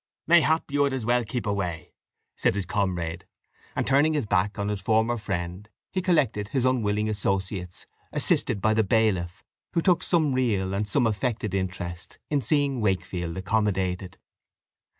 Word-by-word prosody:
"Mayhap 160 -2 +4
you 145 0 +3
had 140 - -1
as 130 -4 -3
well 120 +1 +2
keep 115 +2 -4
away," 95 -6 -3 0.4
said - - +1
his 100 -2 -2
comrade; 90 -4 -2 0.5
and - - 0
turning 145 +4 +3
his 145 - 0
back 100 +1 +1
on 100 -1 -1
his 105 -2 -3
former 110 +3 +2
friend, 95 -1 -4 0.2
he 185 - -1
collected 145 - +1
his 130 +2 0
unwilling 110 -4 +1
associates, 95 -3 -2 0.3
assisted 100 - +1
by 110 +2 +3
the 110 0 +3
bailiff, 100 -3 +1 0.3
who 170 - +2
took 180 -3 +3
some 160 -6 +2
real 105 -7 0
and 105 +2 -1
some 120 - +2
affected 110 -2 -1
interest 90 -2 -4
in 145 -2 +2
seeing 140 -4 +1
Wakefield 90 -3 -1
accommodated. 95 -2 -1
105 Hz, 155 wpm, -26 LUFS, 95-125 Hz, 0.5 s, Mayhap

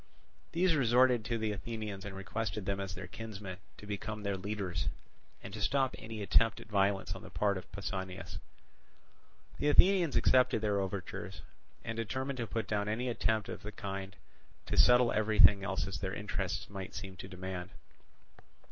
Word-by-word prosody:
These 175 +1 +3
resorted 125 -2 +4
to 115 - 0
the 110 -1 -1
Athenians 105 -1 -5
and 100 -1 -6
requested 105 +2 -3
them 100 0 -1
as 95 -2 -4
their 95 - -6
kinsmen 100 -1 -7 0.2
to - - -11
become 105 +1 -4
their 100 -1 0
leaders, 95 -4 -3 0.6
and 100 - -8
to 110 - -5
stop 130 +5 +2
any 110 -2 -6
attempt 115 +4 +4
at - - -10
violence 100 -3 +1
on 95 - -8
the - - -10
part 100 -1 +1
of 95 - -7
Pausanias. 95 -2 -5 1.2
The 145 - +2
Athenians 175 -1 +6
accepted 125 -4 +4
their 105 -2 +2
overtures, 95 -1 -4 0.4
and 115 - -4
determined 130 +4 -2
to 120 -2 -2
put 115 +2 -2
down 105 -1 0
any 120 +4 -1
attempt 110 -2 +1
of - - -6
the 105 0 -6
kind 100 -1 -5
and - - -31
to - - 0
settle 125 -1 +6
everything 105 -2 +6
else 80 -5 -1
as 95 - -4
their 95 0 -3
interests 100 -2 -3
might 95 -2 -7
seem 95 -1 -6
to 95 - -7
demand. 95 -1 -5
105 Hz, 175 wpm, -33 LUFS, 95-115 Hz, 1.2 s, Athenians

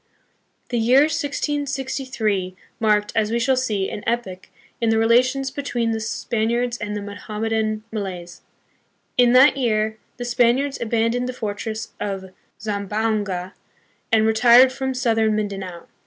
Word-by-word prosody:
The 240 - 0
year 245 +4 +5
1663 270 -9 -1 0.2
marked, 210 -1 +2
as 215 -1 +2
we 230 - 0
shall 255 +3 +2
see, 215 -7 -1
an 205 - -6
epoch 225 -6 -3 0.3
in 230 - +2
the 225 - +3
relations 255 +4 +3
between 245 -5 -2
the 225 - -1
Spaniards 235 +2 -1
and 210 -1 -4
the 205 - -5
Mohammedan 215 +1 -3
Malays. 185 -5 -6 0.7
In 245 -1 +5
that 265 +3 +6
year 220 -3 0 0.2
the 245 - -5
Spaniards 245 +3 +2
aban 230 0 +1
doned 245 +1 -1
the - - -3
fortress 220 -1 -5
of 195 -2 -4 0.3
Zamboanga, 205 -2 -2 0.6
and 220 -1 +4
retired 240 +3 +6
from 265 0 -3
south 235 -3 +1
ern 220 -1 +2
Mindanao. 195 -4 -4
225 Hz, 140 wpm, -22 LUFS, 210-250 Hz, 0.7 s, that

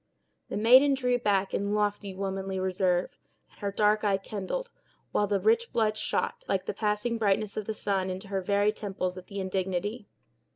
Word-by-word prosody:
The - - -3
maiden 260 +6 +6
drew 250 -2 +1
back 200 -4 +1
in 200 +1 0
lofty 205 -2 -1
womanly 190 0 -3
reserve, 185 -1 0 0.3
and - - -23
her 200 -2 -2
dark 210 +1 +2
eye 200 -2 +3
kindled, 205 - -5 0.4
while 205 - +2
the 200 -1 +1
rich 465 +1 +2
blood 215 -2 +1
shot, 215 - -2
like - - 0
the 440 - -2
passing 215 +2 -1
brightness 205 -1 +1
of 215 - -4
the 220 - -2
sun, 195 -2 -1
into 185 +2 -6
her 195 -1 -1
very 200 +2 +2
temples, 190 -4 -3
at 185 -1 -10
the 200 -1 -6
indignity. 190 +3 -2
205 Hz, 180 wpm, -28 LUFS, 190-215 Hz, 0.4 s, maiden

